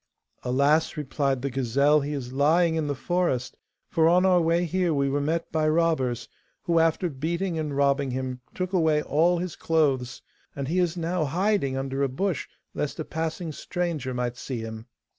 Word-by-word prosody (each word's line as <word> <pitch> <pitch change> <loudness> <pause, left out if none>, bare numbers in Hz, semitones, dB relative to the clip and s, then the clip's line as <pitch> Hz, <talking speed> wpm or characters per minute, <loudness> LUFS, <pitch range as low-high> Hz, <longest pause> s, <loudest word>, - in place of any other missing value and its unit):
'Alas!' 140 +6 +2
replied 135 -2 -1
the 140 - -1
gazelle, 140 +4 +3
'he 145 +1 -3
is 130 -3 -5
lying 160 +5 +3
in 160 -2 -1
the 145 - -1
forest, 130 -5 -1 0.4
for 165 -1 +4
on 180 +2 +4
our 180 -2 +5
way 170 +2 +2
here 175 -1 0
we 140 -1 +1
were 140 +1 0
met 165 +3 -1
by 155 -1 +1
robbers, 155 -7 +1 0.4
who, 170 -1 +2
after 165 +2 +2
beating 170 +4 -2
and 150 -3 -3
robbing 140 -1 +2
him, 130 0 -4
took 185 +1 -3
away 160 -4 +3
all 170 +4 +2
his 175 -1 -4
clothes. 140 -6 0 0.3
And 140 -1 -3
he 175 +5 +1
is 175 -1 +1
now 170 -1 -1
hiding 170 -3 0
under 135 +1 -2
a 140 - +2
bush, 175 +4 -2 0.3
lest 150 +3 -3
a 155 - -3
passing 160 +1 -3
stranger 160 -4 -3
might 125 -1 -2
see 130 -3 -5
him. 110 +1 -7
150 Hz, 180 wpm, -26 LUFS, 135-170 Hz, 0.4 s, our